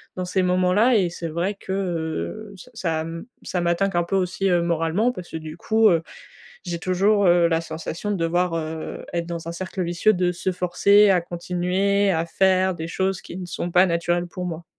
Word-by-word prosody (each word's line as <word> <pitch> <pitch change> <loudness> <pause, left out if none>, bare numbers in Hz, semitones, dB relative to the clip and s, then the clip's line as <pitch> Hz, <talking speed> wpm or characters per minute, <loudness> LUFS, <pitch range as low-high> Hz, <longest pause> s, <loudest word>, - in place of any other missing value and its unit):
dans 185 - -3
ces 185 +1 0
moments-là. 185 +7 +3
Et 185 -4 +2
c'est 170 -1 -6
vrai 175 +6 -2
que, 190 - -9
heu, 170 - -3
ça 250 +8 -14
ça 165 -7 -1
m 165 +1 -6 0.2
ça 180 - -2
m'attaque 175 +2 0
un 175 - +3
peu 195 - -2
aussi, 190 +1 0
heu, 175 -1 +3
moralement 170 +7 +1
parce 180 -7 -9
que - - -4
du 155 +1 -8
coup, 220 +2 +3
heu, 165 -2 +2 0.6
j'ai 170 -2 -4
toujours, 195 +2 +2
heu, 175 -1 +5
la 165 0 +1
sensation 165 +4 -5
de 200 - 0
devoir, 175 +1 0
heu, 160 -1 -5
être 170 -1 -2
dans 170 -1 -6
un - - -3
cercle 185 +1 -4
vicieux, 175 +5 +2
de 180 0 +1
se 185 +2 -2
forcer 200 +3 +4
à 180 -2 +4
continuer 180 +3 0
à 165 0 0
faire 190 +1 +2
des 165 0 -6
choses 190 +1 -1
qui - - -9
ne 180 - -6
sont 175 0 -4
pas 180 +2 +5
naturelles 175 +1 0
pour 180 +1 -6
moi. 170 -1 -5
175 Hz, 210 wpm, -23 LUFS, 170-190 Hz, 0.6 s, heu